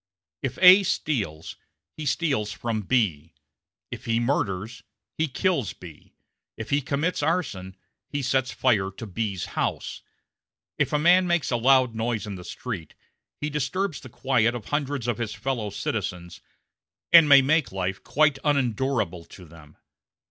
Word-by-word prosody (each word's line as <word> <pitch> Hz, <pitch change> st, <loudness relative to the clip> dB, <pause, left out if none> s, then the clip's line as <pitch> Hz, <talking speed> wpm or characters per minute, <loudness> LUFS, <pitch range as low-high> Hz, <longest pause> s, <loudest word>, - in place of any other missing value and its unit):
If 135 Hz, -, -3 dB
A 185 Hz, +2 st, +10 dB
steals, 105 Hz, -, -2 dB, 0.4 s
he 155 Hz, -1 st, -5 dB
steals 135 Hz, -9 st, 0 dB
from 115 Hz, -2 st, -3 dB
B; 90 Hz, -, -1 dB, 0.6 s
if -, -, -8 dB
he 115 Hz, 0 st, +1 dB
murders, 110 Hz, -3 st, -2 dB, 0.3 s
he 160 Hz, -, 0 dB
kills 140 Hz, -, -1 dB
B; 80 Hz, -4 st, -14 dB, 0.4 s
if 110 Hz, -, -7 dB
he 140 Hz, +1 st, +2 dB
commits 150 Hz, +5 st, -1 dB
arson, 105 Hz, -, -2 dB, 0.3 s
he 145 Hz, -1 st, -3 dB
sets 130 Hz, 0 st, 0 dB
fire 105 Hz, -7 st, +1 dB
to 100 Hz, +4 st, -9 dB
B's 100 Hz, -2 st, -3 dB
house. -, -, -3 dB, 0.8 s
If -, -, +1 dB
a 150 Hz, -, +2 dB
man 180 Hz, +4 st, +4 dB
makes 175 Hz, -6 st, 0 dB
a -, -, +2 dB
loud 130 Hz, 0 st, +4 dB
noise 115 Hz, -1 st, -2 dB
in 105 Hz, -, -6 dB
the 90 Hz, -2 st, -8 dB
street, 95 Hz, -6 st, -7 dB, 0.4 s
he 150 Hz, +1 st, -3 dB
disturbs 150 Hz, +4 st, -2 dB
the 130 Hz, -, -11 dB
quiet 120 Hz, -1 st, +1 dB
of 115 Hz, -4 st, -8 dB
hundreds 145 Hz, -4 st, -2 dB
of 120 Hz, -2 st, -1 dB
his 115 Hz, -1 st, -3 dB
fellow 115 Hz, -2 st, -3 dB
citizens, 90 Hz, -4 st, -4 dB, 0.7 s
and 165 Hz, -3 st, +9 dB
may 140 Hz, -1 st, +8 dB
make 150 Hz, -3 st, +2 dB
life 95 Hz, 0 st, -3 dB
quite 150 Hz, -1 st, +2 dB
unendurable 130 Hz, -, 0 dB
to 90 Hz, -, -14 dB
them. 80 Hz, -2 st, -16 dB
120 Hz, 150 wpm, -25 LUFS, 100-145 Hz, 0.8 s, A